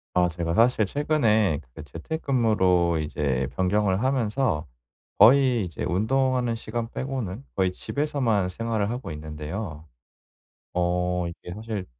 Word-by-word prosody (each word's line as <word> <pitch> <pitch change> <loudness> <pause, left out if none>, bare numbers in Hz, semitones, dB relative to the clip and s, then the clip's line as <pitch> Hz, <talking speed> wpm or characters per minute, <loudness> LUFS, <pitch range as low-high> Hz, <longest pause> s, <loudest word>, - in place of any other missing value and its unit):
아 90 -1 +4
제가 85 0 -2
사실 115 -2 +4
최근에 110 - +2 0.2
그 80 - -8
재택근무로 95 - +1
이제 70 -4 -1
변경을 95 +2 +1
하면서 125 - 0 0.5
거의 125 0 +6
이제 85 -4 -6
운동하는 125 +4 +1
시간 115 +1 -4
빼고는 130 -3 -4
거의 95 -1 +2
집에서만 120 -5 -1
생활을 110 +1 -2
하고 120 -5 -5
있는데요. 75 +2 -6 0.9
어 90 0 0
이게 85 +1 -8
사실 105 -2 -5
105 Hz, 275 characters per minute, -25 LUFS, 90-120 Hz, 0.9 s, 거의